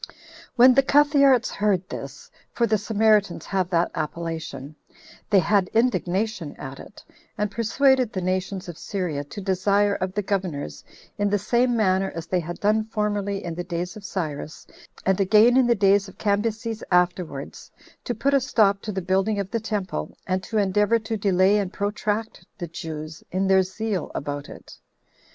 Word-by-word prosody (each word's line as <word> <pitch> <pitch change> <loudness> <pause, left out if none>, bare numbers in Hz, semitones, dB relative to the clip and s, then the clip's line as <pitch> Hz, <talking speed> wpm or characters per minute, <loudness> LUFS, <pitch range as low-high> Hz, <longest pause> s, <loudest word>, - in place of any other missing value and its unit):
4. - - -21 0.4
When 250 +2 +7
the 275 - +5
Cuthearts 275 -3 +4
heard 195 -3 0
this, - - -8 0.2
for 235 - +2
the 215 -2 +1
Samaritans 210 -5 +2
have 190 -2 -1
that 170 -1 +1
appellation, 155 -3 -5 0.5
they 200 - +4
had 195 +1 +3
indignation 210 -7 0
at 135 0 -8
it, - - -13 0.3
and 210 -1 -1
persuaded 255 +2 +2
the 185 - -3
nations 185 +1 -2
of 170 -2 -8
Syria 175 -8 -3
to 175 - -9
desire 200 +2 +2
of 185 0 -3
the 205 - 0
governors, 180 - -3 0.4
in 205 0 +2
the 205 - +2
same 240 +4 +1
manner 190 -2 +2
as 165 -1 -5
they 185 - 0
had 175 +1 -6
done 215 +2 +2
formerly 205 -2 -2
in 170 - -4
the 175 +2 -4
days 175 +1 -4
of 215 - -10
Cyrus, 155 -5 -5 0.4
and 190 0 +2
again 215 +5 +5
in 260 -2 +4
the 235 - +4
days 200 -1 +3
of 190 - -14
Cambyses 220 +2 -1
afterwards, 180 -5 -1 0.3
to 240 - -3
put 275 +6 0
a 275 - +4
stop 210 -7 +2
to 215 - -4
the 190 -2 -4
building 195 +3 +1
of 195 -1 -4
the 230 - 0
temple, 205 - -4
and 185 0 -1
to 220 +4 -4
endeavor 210 +3 +3
to 220 0 -4
delay 195 0 +3
and 195 -3 -2
protract 210 +2 -3
the 175 - -4
Jews 155 -1 -7
in 190 +2 0
their 190 0 +5
zeal 190 0 -3
about 145 0 -4
it. - - -13
200 Hz, 175 wpm, -24 LUFS, 180-220 Hz, 0.5 s, When